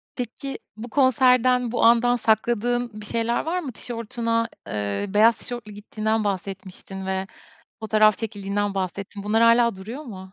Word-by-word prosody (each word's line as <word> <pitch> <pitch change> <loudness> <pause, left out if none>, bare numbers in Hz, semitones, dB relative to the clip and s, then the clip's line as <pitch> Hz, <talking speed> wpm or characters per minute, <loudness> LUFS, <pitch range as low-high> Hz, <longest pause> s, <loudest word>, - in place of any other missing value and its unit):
Peki, 270 +3 -5 0.2
bu 235 +2 -7
konserden, 255 -1 +3
bu 245 - 0
andan 240 +1 +5
sakladığın 235 0 0
bir - - -9
şeyler 230 +5 -1
var 355 +3 -1
mı? 280 -7 -5
Tişörtüne, 230 0 -2 0.2
ııı, 105 - -3
beyaz 225 +2 +5
tişörtlü 240 -4 -7
gittiğinden 215 +1 -2
bahsetmiştin 190 -1 -5
ve 190 0 -2 0.5
fotoğraf 215 -1 +3
çekildiğinden 205 -2 -2
bahsettin. 195 +2 -4
Bunlar 220 +2 +2
hâlâ 235 -1 +5
duruyor 225 +10 -8
mu? 190 -7 -10
220 Hz, 140 wpm, -24 LUFS, 200-240 Hz, 0.5 s, andan